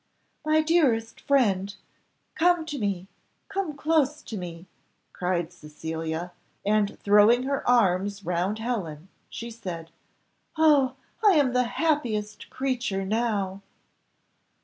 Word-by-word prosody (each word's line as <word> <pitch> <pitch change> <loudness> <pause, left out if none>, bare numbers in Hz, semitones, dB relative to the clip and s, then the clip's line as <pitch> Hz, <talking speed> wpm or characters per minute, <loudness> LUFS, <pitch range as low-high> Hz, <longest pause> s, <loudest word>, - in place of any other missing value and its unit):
"My 310 +1 +3
dearest 260 -9 +2
friend, 200 -8 +2 0.6
come 345 0 +3
to 295 -3 -5
me, 195 -3 -2 0.4
come 370 -7 -3
close 305 -1 +1
to 225 - -7
me," 175 -2 -7 0.5
cried 180 -1 -1
Cecilia, 160 +2 -5 0.3
and 210 0 +1
throwing 210 +4 +5
her 275 -1 -1
arms 200 -3 +2
round 180 +4 0
Helen, 190 -8 -4 0.2
she 235 0 -7
said, 175 -8 -7 0.7
"Oh, 290 -5 +4 0.3
I 415 -2 +7
am 285 -6 +3
the 250 0 +3
happiest 235 -7 -1
creature 245 -7 -2
now!" 200 -3 -1
220 Hz, 110 wpm, -26 LUFS, 185-275 Hz, 0.7 s, I